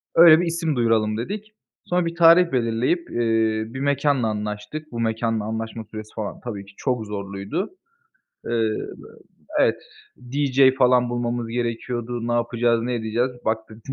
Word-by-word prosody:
Öyle 165 -1 +9
bir 175 - 0
isim 165 -2 -1
duyuralım 110 -3 +2
dedik. 210 - -5 0.3
Sonra 180 0 +1
bir 165 0 -3
tarih 170 +1 +6
belirleyip, 125 +7 0
eee, 115 -2 +1
bir 130 - -5
mekânla 140 -3 +1
anlaştık. 105 +8 -5
Bu 120 - -5
mekânla 110 -1 0
anlaşma 110 +1 -4
süresi 110 0 -9
falan, 110 -2 -5
tabii 100 -5 -6
ki 100 - -17
çok 125 -5 -1
zorluydu. 100 - -4 0.8
Eee, 115 -2 +1 0.9
evet, - - +3 0.5
DJ 135 -1 +4
falan 125 -1 +4
bulmamız 120 -1 -2
gerekiyordu. 120 0 -3
Ne 120 - 0
yapacağız, 120 0 +1
ne 125 +1 -1
edeceğiz? 115 +2 0
Baktık, 110 0 -2
120 Hz, 140 wpm, -23 LUFS, 110-135 Hz, 0.9 s, Öyle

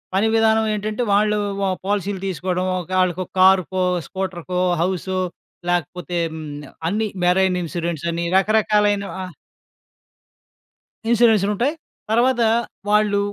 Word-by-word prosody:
పని 200 +3 +3
విధానం 220 0 +3
ఏంటంటే 215 +3 -2
వాళ్ళు 210 +1 +3 0.2
వ 200 - 0 0.2
పాలసీలు 200 -1 -1
తీసుకోడం. 180 +1 -2
ఒక 175 - -9
ఆళ్ళకో 185 0 0 0.2
కారుకో, 185 0 +4 0.2
స్కూటర్‌కో, 185 -1 -3 0.2
హౌసు. 185 +1 -1 0.5
లేకపోతే 175 +1 -2 0.2
హ్మ్. 160 -1 -7 0.4
అన్నీ 215 +4 0 0.2
మెరైన్ 180 +1 +3
ఇన్సూరెన్స్ 170 -1 -3
అని 170 +1 -2
రకరకాలైనవ 210 -1 +2
ఆహ్, 180 -2 -8 1.8
ఇన్సూరెన్స్‌లుంటాయి. 230 +2 +3 0.4
తర్వాత, 240 +2 +3 0.5
వాళ్ళు 210 -1 +3
195 Hz, 105 wpm, -21 LUFS, 180-210 Hz, 1.8 s, కారుకో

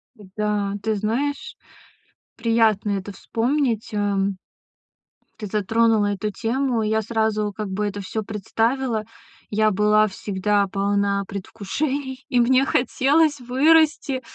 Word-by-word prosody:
Да, 205 -1 -2
ты 220 0 0
знаешь, 275 - -2 0.8
приятно 225 -3 +2
это 200 0 -3
вспомнить, 235 +2 -1
ам. 200 -1 0 1.0
Ты 210 - -5
затронула 215 +1 +2
эту 210 +1 -3
тему. 240 +2 -1
Я 220 +1 +1
сразу 220 -1 -1
как 215 0 -4
бы 200 +2 -2
это 205 0 -5
всё 215 +3 -4
представила. 225 +3 -1 0.4
Я 215 +1 +2
была 210 +2 +3
всегда 200 0 0
полна 200 +1 0
предвкушений, 265 +8 -4
и 250 - +2
мне 255 +3 +4
хотелось 285 +4 +2
вырасти. 280 +1 +3
220 Hz, 115 wpm, -22 LUFS, 205-255 Hz, 1.0 s, мне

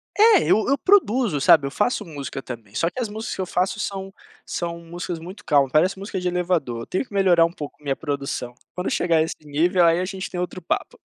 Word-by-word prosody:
É, 425 -3 +6
eu 220 - +3
eu 280 - +3
produzo, 250 - +3
sabe, 145 -1 +6
eu 140 - -3
faço 210 - 0
música 140 -4 -6
também. 115 -5 -9
Só 165 - +1
que 255 - -4
as 220 - -2
músicas 220 +2 -5
que 190 - -3
eu - - -1
faço 185 +3 0
são 195 -1 -4 0.3
são 170 -1 -3
músicas 175 +1 -6
muito 185 +5 -10
calmas, 140 -3 +3
parece 180 +5 +3
música 195 -1 -5
de 180 - -2
elevador. 170 -10 -1
Tenho 185 - -1
que 205 - -18
melhorar 180 -4 +5
um 170 - -2
pouco 150 -3 -9
minha 140 -2 -1
produção. 140 -4 -4 0.2
Quando 180 - -2
chegar 170 -2 +2
a 155 - +4
esse 160 - -3
nível, 170 +5 +2
aí 165 +1 +4
a 185 - -1
gente 190 0 -5
tem 180 - -5
outro 180 +1 -4
papo. - - -3
175 Hz, 235 wpm, -23 LUFS, 150-195 Hz, 0.3 s, É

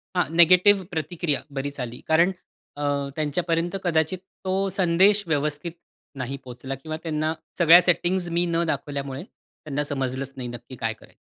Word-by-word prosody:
हां, 180 - +3
नेगेटिव्ह 185 +3 +6
प्रतिक्रिया 160 -1 -1 0.2
बरीच 140 +1 -5
आली. 125 -1 -5
कारण 170 +4 +4 0.5
अ, 145 - -3 0.3
त्यांच्यापर्यंत 165 +3 -1
कदाचित 160 0 +1 0.3
तो 185 - 0 0.2
संदेश 195 +3 +4
व्यवस्थित 150 +1 -1 0.5
नाही 135 +1 -4
पोहचला 130 +2 -6
किंवा 155 +4 -6
त्यांना 155 -1 -1 0.3
सगळ्या 170 +1 +9
सेटिंग्ज 175 0 +1
मी 175 - +3
न 170 0 +1
दाखवल्यामुळे 140 -1 -3
त्यांना 150 - -7
समजलंच 135 -1 -3
नाही 125 -2 -4
नक्की 120 +2 -9
काय 115 -2 -2
करायचं? 110 - -20
155 Hz, 145 wpm, -25 LUFS, 140-175 Hz, 0.5 s, सगळ्या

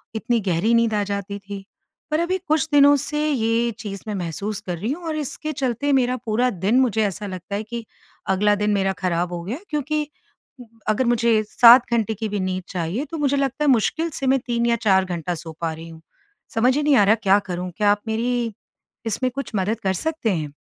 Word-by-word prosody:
इतनी 235 +1 0
गहरी 180 +7 +2
नींद 230 -1 +3
आ 210 -1 +1
जाती 200 0 -4
थी। 200 0 -8 0.5
पर 305 - +2
अभी 350 +2 0
कुछ 310 0 +2
दिनों 285 0 +7
से 300 0 -2
ये 235 -3 +1
चीज़ 200 -2 -6
मैं 210 - -3
महसूस 195 +3 -4
कर 180 -2 -4
रही 210 +9 -2
हूँ 340 +5 -5
और 315 - -2
इसके 305 +1 -4
चलते 270 -1 -1
मेरा 250 0 0
पूरा 235 +3 +1 0.2
दिन 230 +6 +4
मुझे 225 -4 +2
ऐसा 205 +1 -4
लगता 185 +1 -6
है 210 - -2
कि 235 +1 -6 0.5
अगला 210 +2 +3
दिन 210 - +2
मेरा 195 -1 +1
खराब 175 0 0
हो 175 - -4
गया 215 +9 -4
है। 355 - -17
क्योंकि 300 0 -1 0.8
अगर 215 +5 +2
मुझे 235 -2 +3
7 240 +1 +7
घंटे 225 -1 +1
की 220 +1 -4
भी 205 0 -2
नींद 185 -1 -2
चाहिए 180 - -2
तो 325 - -4
मुझे 280 -1 +1
लगता 275 +1 -1
है - - +4
मुश्किल 315 +8 +1
से 270 - -2
मैं 265 +1 +4
3 235 -1 0
या 235 0 +3
4 190 -1 +4
घंटा 175 -1 -3
सो 165 0 -8
पा 165 -1 -1
रही 165 +1 -9
हूँ। 160 0 -12 0.5
समझ 250 +3 +3
ही 300 - 0
नहीं 290 -2 +4
आ 205 - +6
रहा 205 +2 +5
क्या 205 -2 +3
करूँ? 180 0 -3
क्या 205 -1 +4
आप 205 0 0
मेरी 230 +1 -1 0.5
इसमें 255 +3 -1
कुछ 275 - -5
मदद 205 +3 0
कर 190 -1 0
सकतें 295 - -1
हैं? 150 -3 -4
225 Hz, 220 wpm, -22 LUFS, 195-260 Hz, 0.8 s, दिनों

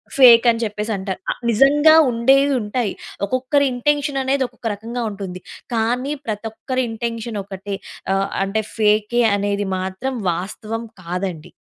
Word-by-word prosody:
Fake 245 -3 +8
అని 230 0 +1
చెప్పేసి 210 0 -3
అంటారు. 190 -1 -4 0.3
నిజంగా 290 +7 +5 0.2
ఉండేవి 270 +4 +3
ఉంటాయి. 210 0 -1 0.3
ఒక్కొక్కరి 255 +6 +1
ఇంటెన్షన్ 285 +2 0
అనేది 265 0 +1
ఒక్కొక్క 245 -1 -8
రకంగా 230 +4 -5
ఉంటుంది. 195 -3 -6 0.3
కానీ 240 +5 0
ప్రతి 215 -1 -4
ఒక్కరి 255 +4 -2
ఇంటెన్షన్ 230 -1 -4
ఒకటే 195 +1 -6 0.4
ఆహ్, 195 0 +1 0.2
అంటే 195 +3 -1
ఫేకే 215 +2 +2
అనేది 200 0 -1
మాత్రం 190 +8 -3 0.2
వాస్తవం 215 +6 -5 0.2
కాదండి. 180 -2 -4
225 Hz, 130 wpm, -20 LUFS, 200-255 Hz, 0.4 s, Fake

